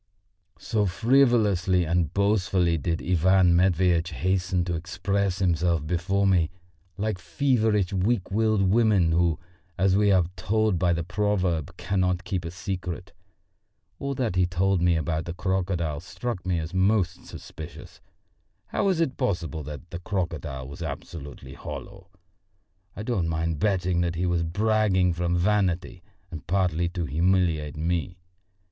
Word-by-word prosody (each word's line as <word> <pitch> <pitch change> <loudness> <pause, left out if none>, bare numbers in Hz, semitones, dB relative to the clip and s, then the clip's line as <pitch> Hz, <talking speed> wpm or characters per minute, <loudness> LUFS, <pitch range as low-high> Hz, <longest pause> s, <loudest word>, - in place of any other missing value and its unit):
So 105 -2 0
frivolously 105 -5 +3
and 85 -1 +1
boastfully 100 -4 +2
did 80 +3 -2
Ivan 90 0 +4
Matveitch 90 -1 +3
hasten 90 +1 0
to 90 - -2
express 95 +3 -1
himself 85 -4 +1
before 95 +4 0
me, 90 -4 +3 0.5
like 105 -2 -2
feverish 110 -7 +1
weak 95 +1 0
willed 110 -1 +2
women 100 -4 +3
who, 85 -1 +2 0.4
as 95 0 +3
we 100 0 +4
are 95 -3 +4
told 110 -2 +1
by 90 -2 +2
the 85 0 0
proverb, 90 -5 -1
cannot 90 -1 0
keep 90 -3 -3
a - - -3
secret. 90 -1 -5 0.9
All 140 0 -3
that 120 -8 -1
he 90 -1 +3
told 90 +1 +1
me 85 -1 +3
about 80 0 -1
the 85 - -5
crocodile 90 -5 -1
struck 115 -3 -5
me 90 -2 +1
as 80 +2 -4
most 95 -2 +1
suspicious. - - -10 0.7
How - - -1
was 190 -4 +2
it 135 -6 -1
possible 85 - -2
that 75 +2 -8
the 85 - -5
crocodile 85 -8 -4
was 70 +6 -10
absolutely 70 -3 -7
hollow? 90 - -9 0.9
I 105 - -5
don't 110 -8 -1
mind 80 -1 -1
betting 90 -3 +1
that 85 0 -1
he 90 +2 -1
was 85 -1 +1
bragging 95 0 +2
from 85 +1 0
vanity 90 -1 0 0.3
and 80 -1 -8
partly 85 -2 +1
to 85 -1 -3
humiliate 80 -1 +1
me. 85 +2 -2
90 Hz, 140 wpm, -26 LUFS, 85-100 Hz, 0.9 s, Ivan